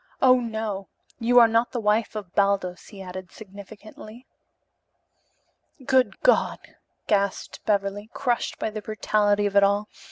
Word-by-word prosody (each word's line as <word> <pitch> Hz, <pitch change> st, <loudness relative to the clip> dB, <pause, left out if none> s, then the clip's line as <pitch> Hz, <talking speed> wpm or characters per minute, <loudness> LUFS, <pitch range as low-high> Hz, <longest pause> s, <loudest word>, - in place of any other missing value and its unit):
"Oh, 255 Hz, -1 st, +5 dB
no. 220 Hz, -4 st, -4 dB, 0.3 s
You 245 Hz, +1 st, +2 dB
are 235 Hz, -1 st, +9 dB
not 230 Hz, +1 st, 0 dB
the 245 Hz, -, -2 dB
wife 215 Hz, +1 st, 0 dB
of 200 Hz, -4 st, -7 dB
Baldos," 195 Hz, -3 st, 0 dB
he 200 Hz, -3 st, -10 dB
added 185 Hz, 0 st, -9 dB
significantly. 215 Hz, +3 st, -12 dB, 1.6 s
"Good 260 Hz, -1 st, +2 dB
God!" -, -, +3 dB, 0.5 s
gasped 200 Hz, -2 st, -1 dB
Beverly, 205 Hz, +1 st, -1 dB
crushed 245 Hz, -3 st, -2 dB
by 220 Hz, -, -3 dB
the 215 Hz, 0 st, -6 dB
brutality 205 Hz, 0 st, 0 dB
of 200 Hz, 0 st, -2 dB
it 200 Hz, -, +7 dB
all. 200 Hz, +1 st, +1 dB
210 Hz, 135 wpm, -24 LUFS, 200-230 Hz, 1.6 s, are